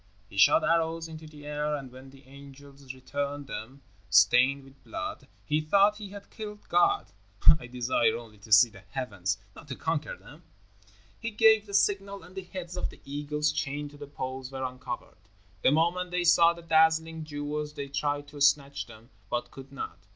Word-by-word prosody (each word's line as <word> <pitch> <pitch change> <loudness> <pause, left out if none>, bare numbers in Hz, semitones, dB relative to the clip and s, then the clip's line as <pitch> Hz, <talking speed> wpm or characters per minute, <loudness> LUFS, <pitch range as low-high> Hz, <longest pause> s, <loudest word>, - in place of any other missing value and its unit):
He - - -12
shot - - +6
arrows 165 0 +1
into 160 -1 -10
the 150 -1 -13
air, 150 0 -1
and 135 -3 -7
when 130 +1 -12
the 135 +1 -17
angels 140 0 -12
returned 140 +2 -4
them 135 +1 -8 0.3
stained 125 +10 +5
with 135 0 -19
blood, - - -6 0.2
he 150 +1 +1
thought 200 +7 +4
he 210 -2 -8
had 200 0 -11
killed 210 -1 -8
God. 405 0 +3 0.5
I 120 - -9
desire 120 -2 +1
only 110 -3 -12
to 110 +2 -15
see 105 +4 +8
the 100 - -13
heavens, 95 -2 -3 0.2
not 150 - -13
to 130 - -5
conquer 160 -2 -2
them." 150 +3 -15 0.8
He 230 - -3
gave 220 -1 +5
the 200 - -3
signal, 200 -1 +1
and 180 +3 -14
the 190 - -5
heads 180 -1 -7
of - - -2
the - - -14
eagles 150 +1 -1
chained 145 -1 -3
to 145 - -14
the 145 0 -9
poles 130 -2 -6
were 135 0 -4
uncovered. 125 -1 -6 0.4
The - - +5
moment 170 +4 +1
they 180 0 0
saw 170 0 +6
the 170 0 -12
dazzling 160 0 +3
jewels 150 0 -4
they 140 -2 -4
tried 145 +1 -2
to 145 0 -10
snatch 140 -1 +2
them, 115 +2 -15 0.2
but 120 0 -2
could 135 0 -11
not. 135 -10 -6
145 Hz, 190 wpm, -28 LUFS, 130-165 Hz, 0.8 s, see